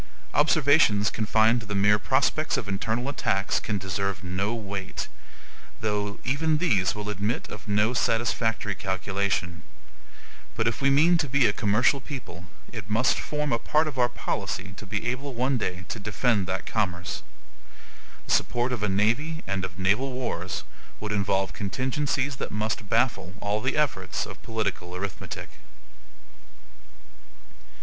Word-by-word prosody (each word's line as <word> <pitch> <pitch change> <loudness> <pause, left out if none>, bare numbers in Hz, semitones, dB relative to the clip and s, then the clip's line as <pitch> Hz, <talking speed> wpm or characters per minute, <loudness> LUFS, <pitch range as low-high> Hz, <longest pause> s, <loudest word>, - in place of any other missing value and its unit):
Observations 145 -9 +4
confined 110 +2 +3
to 115 - -9
the 105 - -2
mere 105 +1 +4
prospects 140 +6 +2
of 105 - -3
internal 110 +5 -1
attacks 100 -7 +1
can 105 - -2
deserve 95 0 -2
no 95 +3 -1
weight; 100 -4 -4 0.7
though 105 -1 -1
even 155 +4 +2
these 105 - +2
will 105 0 -5
admit 105 +3 -1
of 105 -2 -9
no 105 +3 +3
satisfactory 115 -3 +1
calculation: 95 -3 -1 0.9
but 115 0 +1
if 115 +1 -1
we 140 - +4
mean 165 +5 +5
to 150 -3 0
be 140 -1 +4
a 105 - +4
commercial 115 +6 +3
people, 105 - -8 0.3
it 110 -4 -6
must 115 +5 +3
form 150 -2 -1
a 115 - +2
part 155 +6 +2
of 140 -4 -4
our 120 0 +4
policy 95 -5 -3
to 105 - -10
be 105 +2 -2
able 130 +2 -2
one 130 +2 +1
day 90 -3 -3
to 110 - -4
defend 105 -1 +1
that 95 +2 -2
commerce. 90 -5 -1 1.0
The - - -4
support 120 +1 +2
of 120 - -3
a 105 - +1
navy 120 +12 +1
and 95 0 -2
of 95 -1 -5
naval 105 +9 +1
wars 95 -9 -3 0.4
would 105 0 -4
involve 95 -2 +1
contingencies 130 +5 -1
that - - -3
must 105 -1 -2
baffle 110 -6 +1
all 105 +1 -1
the 130 +5 0
efforts 95 - 0
of - - -10
political 100 -5 -3
arithmetic. 95 -1 -6
110 Hz, 150 wpm, -27 LUFS, 100-130 Hz, 1.0 s, mean